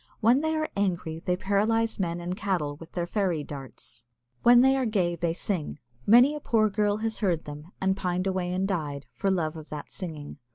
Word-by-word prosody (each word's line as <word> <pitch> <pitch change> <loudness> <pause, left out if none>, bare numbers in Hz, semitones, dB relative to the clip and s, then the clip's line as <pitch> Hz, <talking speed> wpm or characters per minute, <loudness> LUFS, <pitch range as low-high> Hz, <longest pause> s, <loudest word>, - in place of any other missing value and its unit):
When 240 +5 +4
they 315 0 0
are 310 0 0
angry 180 -5 -1
they 180 +2 -1
paralyse 215 +4 +1
men 170 -2 -1
and 175 +1 -3
cattle 175 -8 -1
with 165 +1 -13
their 175 -1 -1
fairy 180 -5 0
darts. 125 -4 -10 0.3
When 240 0 +7
they 265 +1 +5
are 260 -2 +1
gay 180 -5 +1
they 170 0 -1
sing. 180 -6 -3 0.3
Many 245 +7 +7
a 300 - -4
poor 215 -6 +2
girl 205 0 +1
has 220 -1 -2
heard 175 -6 0
them, 150 +4 -9
and 190 0 +1
pined 180 -1 -1
away 185 -2 -1
and 185 +2 0
died, 145 -8 -3
for 195 - -1
love 165 -4 0
of 155 -1 -10
that 150 -1 -7
singing. 155 -5 -6
185 Hz, 205 wpm, -27 LUFS, 165-215 Hz, 0.3 s, When